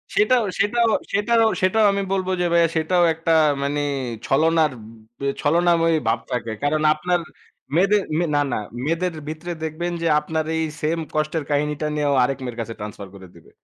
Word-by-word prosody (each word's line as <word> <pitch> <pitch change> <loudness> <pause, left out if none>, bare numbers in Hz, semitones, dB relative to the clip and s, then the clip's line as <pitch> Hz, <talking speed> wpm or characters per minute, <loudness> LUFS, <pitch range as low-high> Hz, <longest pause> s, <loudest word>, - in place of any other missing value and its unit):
সেটাও, 235 +3 +4 0.2
সেটাও, 230 +3 +2 0.2
সেটারও, 225 +2 +3
সেটাও 210 +4 +3
আমি 200 0 -1
বলব 190 -1 0
যে - - +1
ভাইয়া 170 -1 +5
সেটাও 175 +3 +2
একটা 165 +1 -2 0.3
মানে 145 +1 -1 0.5
ছলনার, 160 +1 +3 0.5
উব - - -18 0.2
ছলনাময়ী 165 +1 +3
ভাব 115 - +2
থাকে। 115 -2 -2
কারণ 155 +1 +1
আপনার 175 +3 0 0.6
মেয়েদের, 200 +3 +4 0.3
না, - - +3
না, - - 0 0.3
মেয়েদের 165 +2 -1
ভিতরে 160 +3 -5
দেখবেন 165 +3 -3
যে 165 - 0
আপনার 160 +1 -3
এই 160 - 0 0.2
সেম 165 +2 0 0.2
কষ্টের 155 0 -1
কাহিনীটা 150 +1 0
নিয়েও 145 -1 +1
আরেক 135 +1 0
মেয়ের 120 -2 -6
কাছে 115 0 -5
ট্রান্সফার 105 -1 -7
করে 95 -1 -12
দিবে। 85 - -18
160 Hz, 165 wpm, -22 LUFS, 145-180 Hz, 0.6 s, ভাইয়া